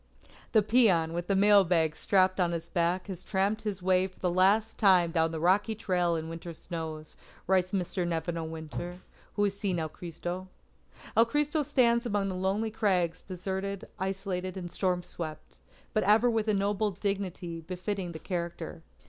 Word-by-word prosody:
"The 220 Hz, -2 st, +5 dB
peon 195 Hz, -8 st, +4 dB
with 175 Hz, +2 st, -4 dB
a 195 Hz, -, +3 dB
mail 200 Hz, 0 st, +6 dB
bag 165 Hz, -4 st, +2 dB
strapped 185 Hz, 0 st, +2 dB
on 175 Hz, -2 st, +2 dB
his 170 Hz, 0 st, -4 dB
back 175 Hz, +1 st, 0 dB
has 185 Hz, -3 st, -7 dB
tramped 200 Hz, +2 st, 0 dB
his 205 Hz, -4 st, -4 dB
way 185 Hz, 0 st, +3 dB
for 185 Hz, -, -21 dB
the 180 Hz, -, 0 dB
last 200 Hz, +5 st, +3 dB
time 185 Hz, -5 st, +5 dB
down 165 Hz, 0 st, +2 dB
the 160 Hz, -1 st, -4 dB
rocky 195 Hz, +6 st, +2 dB
trail 180 Hz, -5 st, +1 dB
in 160 Hz, -1 st, -3 dB
the -, -, -7 dB
winter 165 Hz, 0 st, -7 dB
snows," 160 Hz, -2 st, -6 dB, 0.3 s
writes 185 Hz, -1 st, +2 dB
Mr. 180 Hz, -2 st, -1 dB
Nevin 170 Hz, 0 st, -2 dB
O. 165 Hz, -, -3 dB
Winter, 160 Hz, +3 st, -6 dB, 0.3 s
who 205 Hz, -, +2 dB
has 200 Hz, -1 st, +1 dB
seen 200 Hz, -3 st, -1 dB
El 160 Hz, -1 st, -2 dB
Cristo. 175 Hz, +3 st, -6 dB, 0.7 s
"El 230 Hz, -, +6 dB
Cristo 295 Hz, +5 st, 0 dB
stands 245 Hz, -4 st, +2 dB
among 205 Hz, -3 st, 0 dB
the -, -, -3 dB
lonely 195 Hz, +4 st, -1 dB
crags 180 Hz, -6 st, +1 dB
deserted, 190 Hz, +1 st, -4 dB
isolated, 190 Hz, -1 st, -3 dB
and 175 Hz, -2 st, -6 dB
storm 180 Hz, -2 st, 0 dB
swept; 155 Hz, -, -7 dB, 0.3 s
but -, -, +2 dB
ever 215 Hz, +5 st, +4 dB
with 225 Hz, -1 st, 0 dB
a 215 Hz, -, +3 dB
noble 205 Hz, +2 st, +1 dB
dignity 190 Hz, -4 st, -3 dB
befitting 185 Hz, +2 st, -4 dB
the 160 Hz, -, -7 dB
character." 170 Hz, 0 st, -5 dB
185 Hz, 180 wpm, -29 LUFS, 170-200 Hz, 0.7 s, mail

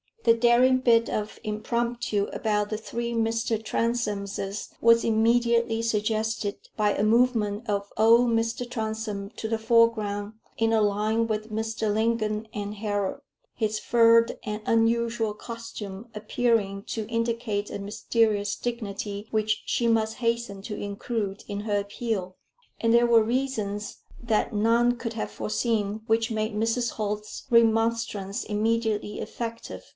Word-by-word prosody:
The 230 Hz, -, +6 dB
daring 245 Hz, +2 st, +4 dB
bit 230 Hz, -2 st, +4 dB
of 210 Hz, 0 st, -3 dB
impromptu 230 Hz, 0 st, -1 dB
about 210 Hz, -2 st, 0 dB
the 215 Hz, -, -2 dB
three 235 Hz, +2 st, -4 dB
Mr. 225 Hz, -1 st, 0 dB
Transomes 210 Hz, -4 st, -2 dB
was 230 Hz, 0 st, +5 dB
immediately 230 Hz, 0 st, +2 dB
suggested 220 Hz, -1 st, -1 dB, 0.2 s
by 210 Hz, -2 st, +2 dB
a 200 Hz, -, 0 dB
movement 225 Hz, -1 st, +2 dB
of 200 Hz, -1 st, -2 dB
old 230 Hz, +3 st, +5 dB
Mr. 230 Hz, +2 st, -1 dB
Transome 220 Hz, -3 st, -3 dB
to 220 Hz, -, -3 dB
the 225 Hz, 0 st, 0 dB
foreground 220 Hz, -2 st, +2 dB, 0.2 s
in 225 Hz, 0 st, +2 dB
a 220 Hz, -, +4 dB
line 215 Hz, +2 st, +1 dB
with 215 Hz, 0 st, -3 dB
Mr. 220 Hz, 0 st, -1 dB
Lingon 220 Hz, 0 st, 0 dB
and 205 Hz, 0 st, -4 dB
Harold; 205 Hz, -2 st, -2 dB, 0.3 s
his 215 Hz, -1 st, -1 dB
furred 230 Hz, 0 st, +4 dB
and 210 Hz, -1 st, -4 dB
unusual 230 Hz, -1 st, +2 dB
costume 230 Hz, -2 st, -8 dB
appearing 210 Hz, -3 st, 0 dB
to 220 Hz, -2 st, -4 dB
indicate 230 Hz, -2 st, -1 dB
a -, -, -4 dB
mysterious 205 Hz, 0 st, 0 dB
dignity 210 Hz, -3 st, -4 dB
which 215 Hz, -1 st, 0 dB
she 235 Hz, -, 0 dB
must 220 Hz, -1 st, +2 dB
hasten 230 Hz, -4 st, -2 dB
to 210 Hz, -1 st, -5 dB
include 205 Hz, 0 st, -4 dB
in 205 Hz, 0 st, -4 dB
her 205 Hz, -1 st, 0 dB
appeal. 200 Hz, -2 st, -3 dB, 0.4 s
And 230 Hz, 0 st, +2 dB
there 240 Hz, 0 st, +5 dB
were 230 Hz, -1 st, +6 dB
reasons 220 Hz, -4 st, -2 dB, 0.2 s
that 230 Hz, -1 st, 0 dB
none 235 Hz, +3 st, +3 dB
could 230 Hz, 0 st, -4 dB
have 225 Hz, -, -4 dB
foreseen, 215 Hz, -2 st, -1 dB
which 225 Hz, 0 st, +1 dB
made 215 Hz, 0 st, -1 dB
Mrs. 225 Hz, +2 st, 0 dB
Holt's 210 Hz, 0 st, -4 dB
remonstrance 225 Hz, -3 st, +2 dB
immediately 215 Hz, -1 st, -1 dB
effective. 230 Hz, -1 st, -6 dB
220 Hz, 135 wpm, -26 LUFS, 210-230 Hz, 0.4 s, The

